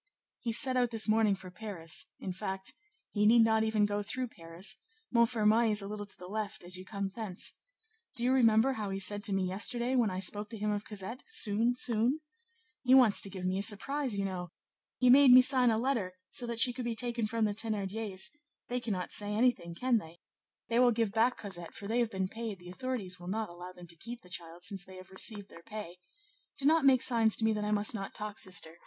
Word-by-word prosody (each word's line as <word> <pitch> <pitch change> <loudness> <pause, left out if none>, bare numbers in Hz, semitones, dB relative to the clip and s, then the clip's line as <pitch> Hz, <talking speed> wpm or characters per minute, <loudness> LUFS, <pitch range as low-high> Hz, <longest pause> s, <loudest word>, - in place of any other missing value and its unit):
"He 235 - -3
set 255 +3 +2
out 245 -1 +2
this 225 -1 +1
morning 215 -2 +3
for 185 -1 -11
Paris; 180 -5 -4
in 190 - -5
fact, 190 0 -4 0.4
he 210 0 +2
need 230 +1 +6
not 220 0 +3
even 220 -1 +2
go 205 0 -1
through 250 +4 -3
Paris; 170 +1 -6 0.4
Montfermeil 230 -1 +3
is 210 -1 +1
a - - -6
little 205 0 -6
to - - -10
the 180 - -11
left 215 0 -5
as 180 +1 -3
you 185 - -7
come 200 0 -4
thence. 200 -3 -4 0.6
Do 235 - -1
you 255 +1 +3
remember 235 0 +4
how 210 -4 -4
he 195 - -3
said 205 +1 +1
to - - -2
me 195 -1 +1
yesterday, 240 +7 -1
when 240 -4 +3
I 185 0 -4
spoke 205 +2 0
to 230 - -7
him 210 0 -1
of 205 0 -3
Cosette, 210 +4 -6
Soon, 235 - +3
soon? 245 +4 +1 0.6
He 260 0 +5
wants 245 -6 +6
to 195 - +4
give 185 -1 -7
me 185 +1 0
a - - 0
surprise, 235 +4 +1
you 200 - -1
know! 180 -2 -5 0.5
he 250 -1 +4
made 275 +1 +7
me 250 +1 +10
sign 255 -2 +5
a 220 - +2
letter 230 -7 -1 0.2
so 245 - 0
that 235 -1 -3
she 245 +1 +5
could 250 0 -5
be 235 -1 -2
taken 235 -2 -2
from 225 0 0
the 210 - -1
Thénardiers; 210 -2 -2 0.4
they 250 0 -1
cannot 205 -7 -4
say 205 0 +3
anything, 215 -8 +1
can 245 +4 +1
they? 165 -3 -13 0.5
they 230 +1 +1
will 250 -1 +5
give 225 -2 0
back 230 +4 +2
Cosette, 175 -5 -5
for 200 -3 -8
they 230 +3 0
have 235 -2 +1
been 190 -3 -2
paid; 225 0 -6
the 175 0 -11
authorities 190 -3 -4
will 175 - -10
not 215 +2 -2
allow 175 +1 -9
them 180 -1 -13
to 170 0 -12
keep 235 +8 -9
the 180 - -16
child 170 -1 -5
since 195 -2 -2
they 190 0 -12
have 185 0 -13
received 205 +1 -2
their 170 - -13
pay. 205 -3 -8 0.6
Do 275 - -3
not 315 0 +4
make 260 -2 +6
signs 225 -4 +5
to 220 - 0
me 220 - +3
that 210 -1 -3
I 210 - -2
must 210 +1 +2
not 195 -3 -6
talk, 210 -1 -5
sister! 170 -3 -4
215 Hz, 235 wpm, -31 LUFS, 190-235 Hz, 0.6 s, me